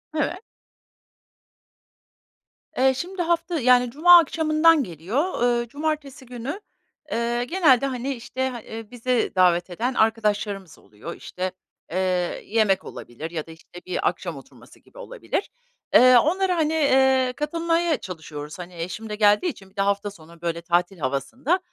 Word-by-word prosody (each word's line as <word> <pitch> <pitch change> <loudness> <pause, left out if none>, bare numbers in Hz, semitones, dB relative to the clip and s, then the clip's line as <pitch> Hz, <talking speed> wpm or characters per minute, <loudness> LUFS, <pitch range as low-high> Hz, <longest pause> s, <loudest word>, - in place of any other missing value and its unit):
Evet. 345 +5 -1 2.4
Eee, 265 +1 +4
şimdi 355 +6 -5
hafta 335 -1 0
yani, 250 -1 +4
cuma 345 +6 +8
akşamından 320 0 +3
geliyor. 220 - -3
Iıı, 240 -1 +1
cumartesi 285 -1 -4
günü, 250 - -6 0.5
eee, 235 +1 0
genelde, 285 -6 +3
hani, 265 +1 -3
işte, 260 +2 -3
ha 240 -2 -7 0.3
bizi 245 0 0
davet 180 -1 +3
eden 235 +9 -2
arkadaşlarımız 210 - 0
oluyor. 110 +11 -10
İşte, 185 0 -5 0.4
eee, 175 - -2 0.5
yemek 210 -3 +1
olabilir 155 +8 -8
ya 160 -2 -5
da, 165 - -10
işte, 165 +2 -13
bir 185 - -1
akşam 170 -6 -6
oturması 135 - -16
gibi - - -22
olabilir. - - -4 0.4
Eee, 255 0 +8
onlara, 365 +7 +2
hani, 315 0 +1
eee, 265 -4 +3
katılmaya 330 +2 0
çalışıyoruz. 155 -1 -8
Hani, 180 0 -9
eşim 180 +6 -6
de 210 - -3
geldiği 210 - +4
için 195 -9 -10
bir 190 - -31
de 195 - 0
hafta 200 +1 0
sonu, 170 -2 -16
böyle, 170 -1 -2
tatil 175 +2 0
havasında, 230 - -1
240 Hz, 140 wpm, -24 LUFS, 185-300 Hz, 2.4 s, cuma